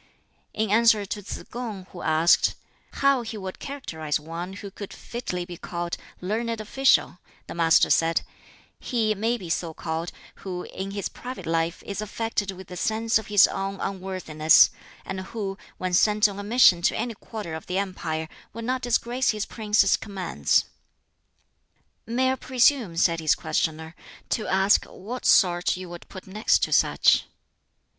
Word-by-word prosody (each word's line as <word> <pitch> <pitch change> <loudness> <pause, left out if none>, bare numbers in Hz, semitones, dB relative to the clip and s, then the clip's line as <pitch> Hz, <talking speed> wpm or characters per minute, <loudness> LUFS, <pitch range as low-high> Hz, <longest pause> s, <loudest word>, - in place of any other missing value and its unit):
In 215 -2 0
answer 220 -1 +4
to 205 +1 -5
Tsz 200 - -7
kung, 225 -6 -5
who 175 - -9
asked, 160 +2 +3 0.5
"how 275 -2 +5
he 225 -1 -6
would 190 -2 -7
characterize 160 - -3
one 165 +4 -6
who 200 0 -8
could 200 +1 -8
fitly 180 -7 -5
be 175 -1 -9
called 170 0 -4 0.3
'learned 225 +4 -2
official,'" 225 -4 +2 0.3
the - - -8
Master 165 -1 +4
said, 165 0 +3 0.6
"He 225 -4 0
may 225 +4 0
be 185 -6 -9
so 165 -1 -2
called 165 +1 -4 0.3
who 180 -2 -5
in 190 +1 -6
his 200 -1 -3
private 255 +1 -8
life 165 +1 -1
is 200 +1 -4
affected 215 -1 -2
with 190 -1 -8
a 180 - -6
sense 225 +4 +1
of 220 - -9
his 205 -2 +7
own 195 0 -3
unworthiness, 185 -5 +3 0.3
and 190 0 -4
who, 195 0 -5 0.2
when 185 -1 -3
sent 210 +3 +4
on 200 -1 -7
a - - -5
mission 205 -5 +5
to - - +1
any 235 +1 -2
quarter 210 -4 -7
of 160 - -7
the 180 - -2
empire, 165 -5 -3 0.3
would 230 +1 -6
not 255 +1 -1
disgrace 245 +1 0
his 215 -1 0
prince's 210 -3 +2
commands." 185 - 0 1.4
"May 260 +3 +1
I - - 0
presume," 250 - +2
said 170 -1 +3
his 155 -2 +3
questioner, 160 0 -2 0.3
"to 220 - -1
ask 195 +2 +4
what 240 +6 -6
sort 175 -1 +4
you 185 -1 -8
would 175 0 -10
put 185 - -10
next 210 +3 +1
to - - 0
such?" - - +4
195 Hz, 165 wpm, -25 LUFS, 175-225 Hz, 1.4 s, his